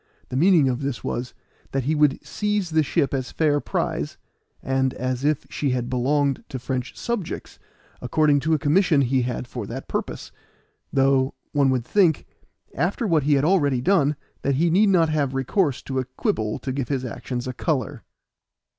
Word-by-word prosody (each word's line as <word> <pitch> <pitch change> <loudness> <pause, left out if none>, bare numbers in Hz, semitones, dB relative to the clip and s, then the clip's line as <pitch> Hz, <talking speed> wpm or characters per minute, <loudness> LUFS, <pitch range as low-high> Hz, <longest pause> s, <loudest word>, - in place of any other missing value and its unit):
The - - -5
meaning 165 -1 +5
of 125 0 -1
this 140 -3 -3
was, 120 +1 -4 0.4
that 135 -1 0
he 150 +5 0
would 150 -2 +2
seize 210 -4 -1
the 160 0 +4
ship 140 -1 0
as 130 -2 -2
fair 150 -2 +2
prize, - - -2 0.5
and 130 0 0
as 130 0 -2
if 150 -1 +1
she 145 - -1
had 125 -1 -1
belonged 140 +2 +1
to 130 - -4
French 125 0 -4
subjects, 235 -7 -4 0.4
according 145 +3 +3
to 160 +3 +1
a - - +1
commission 155 0 +3
he 130 0 +2
had 125 0 -3
for 120 -5 -6
that 130 +5 -6
purpose; - - -4 0.6
though, 135 0 +2 0.2
one 140 -2 +3
would 125 -3 0
think, 175 -5 +2 0.5
after 180 - -1
what 165 -6 +3
he 145 +1 +3
had 140 +1 +2
already 145 -8 +3
done, 150 -1 +2 0.3
that 140 - +1
he 165 +4 +2
need 200 +4 +4
not 170 -4 +4
have 145 -4 0
recourse 135 +2 0
to 130 -1 -2
a 130 - -2
quibble 110 -4 -2
to 135 - -4
give 130 -1 -2
his 135 -3 -2
actions 125 +1 -5
a 130 - -3
color. 130 - -2
140 Hz, 180 wpm, -23 LUFS, 130-155 Hz, 0.6 s, meaning